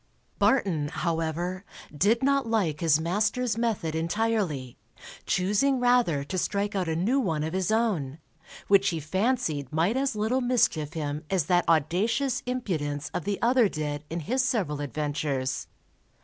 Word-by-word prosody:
Barton, 180 Hz, -, +2 dB
however, 170 Hz, +3 st, -2 dB, 0.3 s
did 215 Hz, -, +2 dB
not 275 Hz, -2 st, +2 dB
like 190 Hz, -10 st, 0 dB
his 160 Hz, -3 st, +3 dB
master's 210 Hz, +7 st, 0 dB
method 220 Hz, -9 st, -1 dB
entirely, 165 Hz, -, -1 dB, 0.5 s
choosing 210 Hz, +9 st, +2 dB
rather 245 Hz, -, +3 dB
to 185 Hz, +6 st, -3 dB
strike 205 Hz, +2 st, -1 dB
out 185 Hz, -4 st, -1 dB
a 160 Hz, -, 0 dB
new 215 Hz, +12 st, +1 dB
one 160 Hz, -, -1 dB
of 160 Hz, +2 st, -3 dB
his 190 Hz, -1 st, 0 dB
own, 190 Hz, -, 0 dB, 0.5 s
which 200 Hz, 0 st, +5 dB
he 165 Hz, -, -2 dB
fancied 160 Hz, -, -1 dB
might 170 Hz, +8 st, +1 dB
as 265 Hz, -3 st, 0 dB
little 220 Hz, +5 st, 0 dB
mischief 205 Hz, -, +1 dB
him 150 Hz, -1 st, -3 dB
as 185 Hz, -6 st, +1 dB
that 175 Hz, +1 st, +2 dB
audacious 225 Hz, -, +1 dB
impudence 155 Hz, -, -3 dB
of 175 Hz, -, -3 dB
the 200 Hz, -1 st, -1 dB
other 240 Hz, -2 st, +4 dB
did 150 Hz, -2 st, -4 dB
in 170 Hz, +1 st, -3 dB
his 255 Hz, -, 0 dB
several 195 Hz, -, -1 dB
adventures. 145 Hz, -2 st, -2 dB
185 Hz, 150 wpm, -27 LUFS, 155-230 Hz, 0.5 s, which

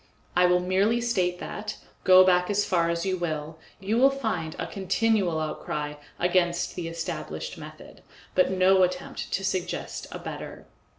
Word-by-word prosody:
I 180 Hz, 0 st, +5 dB
will 180 Hz, 0 st, +4 dB
merely 195 Hz, +6 st, +2 dB
state 185 Hz, -7 st, 0 dB
that, 210 Hz, +3 st, -6 dB, 0.3 s
go 185 Hz, 0 st, +8 dB
as 185 Hz, +3 st, +2 dB
far 170 Hz, -2 st, +2 dB
back -, -, +1 dB
as 170 Hz, +1 st, -2 dB
you 190 Hz, -1 st, 0 dB
will, 155 Hz, -2 st, -4 dB, 0.2 s
you 210 Hz, +4 st, 0 dB
will 270 Hz, +2 st, +7 dB
find 220 Hz, -13 st, -3 dB
a -, -, -3 dB
continual 195 Hz, -3 st, +1 dB
outcry 150 Hz, -1 st, -3 dB, 0.2 s
against 175 Hz, -1 st, +1 dB
the 175 Hz, -2 st, -4 dB
established 160 Hz, -, -5 dB
method, -, -, -12 dB, 0.3 s
but 185 Hz, -, +3 dB
no 190 Hz, 0 st, +4 dB
attempt 180 Hz, 0 st, -1 dB
to 195 Hz, -, -1 dB
suggest 185 Hz, -2 st, -3 dB
a -, -, -5 dB
better. -, -, -8 dB
185 Hz, 160 wpm, -26 LUFS, 170-195 Hz, 0.3 s, go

